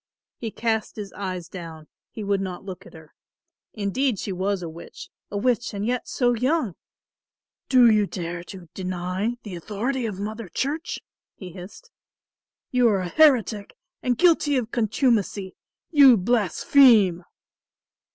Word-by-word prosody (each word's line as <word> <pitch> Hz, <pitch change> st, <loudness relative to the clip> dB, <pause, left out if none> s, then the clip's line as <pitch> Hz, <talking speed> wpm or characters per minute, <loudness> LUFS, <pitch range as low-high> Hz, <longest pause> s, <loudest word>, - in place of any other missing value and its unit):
He 230 Hz, -, -4 dB
cast 220 Hz, 0 st, -2 dB
his 205 Hz, -2 st, -7 dB
eyes 185 Hz, -4 st, -5 dB
down, 165 Hz, -4 st, -9 dB, 0.2 s
he 220 Hz, -, -7 dB
would 200 Hz, -1 st, 0 dB
not 185 Hz, -1 st, -5 dB
look 195 Hz, 0 st, -8 dB
at -, -, -15 dB
her. 160 Hz, -1 st, -15 dB, 0.6 s
Indeed 220 Hz, +4 st, -1 dB
she 195 Hz, -, -4 dB
was 190 Hz, 0 st, -1 dB
a -, -, -4 dB
witch, 165 Hz, +1 st, -11 dB, 0.2 s
a 205 Hz, -, -4 dB
witch 240 Hz, 0 st, 0 dB
and 200 Hz, +1 st, -3 dB
yet 245 Hz, +1 st, -2 dB
so 245 Hz, -2 st, +1 dB
young! 250 Hz, -, 0 dB, 1.0 s
"Do 255 Hz, -2 st, +6 dB
you 215 Hz, -2 st, +4 dB
dare 175 Hz, -2 st, -5 dB
to 185 Hz, -2 st, -11 dB
deny 185 Hz, +5 st, -3 dB
the 205 Hz, -, -8 dB
authority 225 Hz, +8 st, -3 dB
of 200 Hz, -3 st, -6 dB
Mother 215 Hz, 0 st, -5 dB
Church?" 290 Hz, -, -3 dB, 0.4 s
he 185 Hz, -3 st, -9 dB
hissed. 195 Hz, -, -12 dB, 0.8 s
"You 250 Hz, -1 st, +4 dB
are 200 Hz, -3 st, +1 dB
a 180 Hz, -, -4 dB
heretic 235 Hz, -, +3 dB, 0.3 s
and 245 Hz, -2 st, 0 dB
guilty 315 Hz, -5 st, +3 dB
of 240 Hz, -2 st, -3 dB
contumacy. 215 Hz, -4 st, 0 dB, 0.4 s
You 275 Hz, -6 st, +7 dB
blaspheme." 210 Hz, -, +4 dB
210 Hz, 145 wpm, -24 LUFS, 185-245 Hz, 1.0 s, You